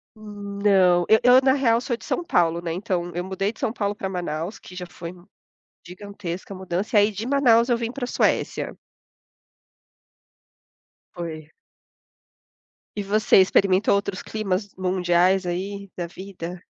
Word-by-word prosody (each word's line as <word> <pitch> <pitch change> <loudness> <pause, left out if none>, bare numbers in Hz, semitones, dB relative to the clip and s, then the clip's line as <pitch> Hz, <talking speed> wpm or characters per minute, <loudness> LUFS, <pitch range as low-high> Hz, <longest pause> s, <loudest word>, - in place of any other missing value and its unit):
Não, 200 -4 +1
eu 220 - +6
eu 250 +1 +7
na 265 0 +4
real 250 -5 +3
eu - - -2
sou 245 -2 -2
de - - -15
São 350 - -2
Paulo, 170 - +1
né? 165 -1 -3
Então 180 -2 -2
eu 175 +1 -3
mudei 190 +2 -2
de - - -20
São 220 - -1
Paulo 205 -3 -2
para 190 - -4
Manaus, 175 +1 -4
que 180 - -13
já 180 -1 -5
foi 170 +1 -8 0.7
gigantesca 185 0 -7
a - - -7
mudança. 190 +3 -2
E - - +8
aí 205 +1 +3
de 210 +3 -5
Manaus 245 -4 +4
eu 240 - +3
vim 230 -1 -3
para 260 0 -5
a - - -2
Suécia. - - 0 2.4
Foi. 160 -3 -7 1.4
E 205 - -2
você 210 +2 +3
experimentou 190 +1 +3
outros 200 -2 -2
climas 200 -2 -2
mundiais 185 0 +2
aí 195 +3 -4
da 175 - -2
vida? 180 -1 -8
195 Hz, 160 wpm, -23 LUFS, 180-215 Hz, 2.4 s, E